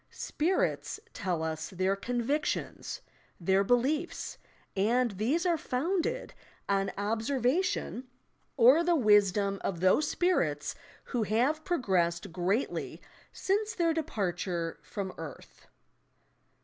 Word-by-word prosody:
"Spirits" 365 +5 -1
tell 180 -6 -2
us 160 -1 -3
their 185 +1 0
convictions, 245 +8 -2 0.4
their 190 +3 +3
beliefs, 270 - 0 0.4
and 235 +5 +2
these 240 - 0
are 340 -3 +2
founded 330 +8 -1 0.3
on 195 0 +1
observation, 250 - 0 0.5
or 265 +7 +7
the 345 0 +3
wisdom 205 - +3
of 175 -4 -2
those 185 - +4
spirits 170 - +1 0.3
who 245 - -2
have 245 +9 +1
progressed 185 - 0
greatly 190 +8 -1 0.3
since 420 +3 -1
their 335 -4 +2
departure 180 - -2
from 195 -2 -5
earth. 155 -4 -10
225 Hz, 100 wpm, -30 LUFS, 190-305 Hz, 0.5 s, or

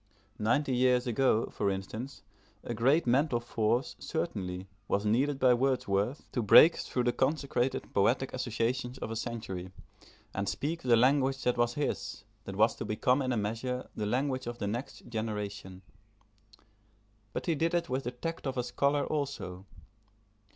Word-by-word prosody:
Ninety 130 +5 +1
years 125 0 +3
ago, 120 -1 +2
for 100 - 0
instance, 110 +7 -5 0.5
great 135 +9 +3
mental 125 +1 +2
force, 120 +1 0
certainly, 95 - -3 0.2
was 100 +1 0
needed 135 +7 +2
by 130 -2 +5
Wordsworth, 125 -2 0
to 125 - -1
break 155 +10 +8
through 125 - -2
the 120 - +2
consecrated 135 -2 0
poetic 120 +7 +2
associations 125 +1 -2
of 110 - -5
a - - -3
century, 110 -6 -5 0.6
and 100 0 -1
speak 165 +4 -2
the 120 -2 +4
language 135 +2 +3
that 125 - +2
was 120 0 +1
his, 100 -8 -3 0.2
that 95 - -6
was 110 +3 +4
to - - -4
become 125 +5 +1
in 130 -1 -1
a 120 - 0
measure 115 +5 -3
the 105 -1 -2
language 130 +2 -1
of 120 0 -4
the - - -3
next 115 +6 -5
generation. 105 -4 -5 1.5
But - - -4
he 170 - +2
did 165 +3 0
it 170 -1 0
with 130 0 -2
the - - 0
tact 155 +5 -5
of 135 - -3
a 125 - +1
scholar 140 +4 +1
also. 100 -11 -4
125 Hz, 160 wpm, -30 LUFS, 110-135 Hz, 1.5 s, break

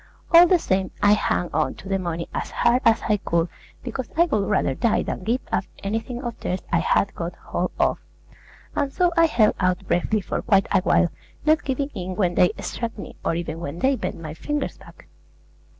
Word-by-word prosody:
All 340 +1 +9
the 365 - +5
same, 190 - 0
I 205 0 +7
hung 180 -4 0
on 150 -3 0
to - - -12
the 195 0 0
money 170 -2 -3
as - - -3
hard 240 +2 +2
as 230 -1 +4
I 210 -2 +3
could, 170 -3 0 0.3
because 255 0 -5
I 340 - +6
would 215 - 0
rather 190 -9 +2
die 225 - +1
than - - -4
give 235 +6 0
up - - 0 0.2
anything 225 +5 -3
of 240 -2 -5
theirs 180 +1 -2
I 170 - +3
had 195 +3 +1
got 170 0 -5
hold 180 +1 -3
of; - - +2 0.8
and 280 - 0
so 355 +1 +2
I 330 -1 +5
held 225 -8 +3
out 185 0 0
bravely 210 +4 +1
for - - -3
quite 195 -1 +3
a 190 - +4
while, 180 -1 +3 0.4
not 310 0 +4
giving 275 +1 -1
in 185 -3 -5
when 180 -3 +1
they 180 0 +4
struck 230 -1 -4
me, - - -8
or - - 0
even 165 -1 -4
when 165 -1 -5
they 270 +8 +2
bent - - -4
my 155 -2 -6
fingers 295 - -3
back. - - -16
200 Hz, 210 wpm, -23 LUFS, 175-250 Hz, 0.8 s, All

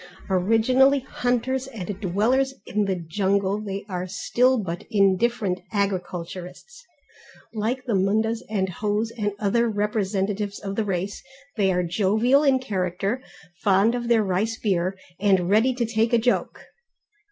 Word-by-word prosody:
Originally 230 +9 +4
hunters 250 +1 -1
and 205 -6 -6
dwellers 230 +8 +1
in 210 0 0
the 195 -1 0
jungle 195 +4 0
they 200 -1 -5
are 180 -2 -4
still 250 +6 +2
but 175 -6 -4
indifferent 200 -1 +2
agriculturists. 185 - -4 0.7
Like 235 +4 -2
the 240 - -1
Mundas 220 +4 +1
and 195 -3 0
Hos 210 +4 -1
and 205 -3 -1
other 230 +3 +1
representatives 205 -1 -1
of 195 -1 -5
the 220 - 0
race, 195 +1 -3 0.3
they 200 -3 +2
are 180 0 +1
jovial 215 +9 +2
in 275 -3 +4
character, 195 0 -2 0.4
fond 200 +3 +3
of 240 -1 -3
their 230 -2 +4
rice 205 +4 -1
beer, 190 -2 0 0.2
and 190 -3 +2
ready 225 +5 +4
to 245 -2 0
take 225 +1 0
a - - +6
joke. 245 +2 0
210 Hz, 140 wpm, -24 LUFS, 190-235 Hz, 0.7 s, a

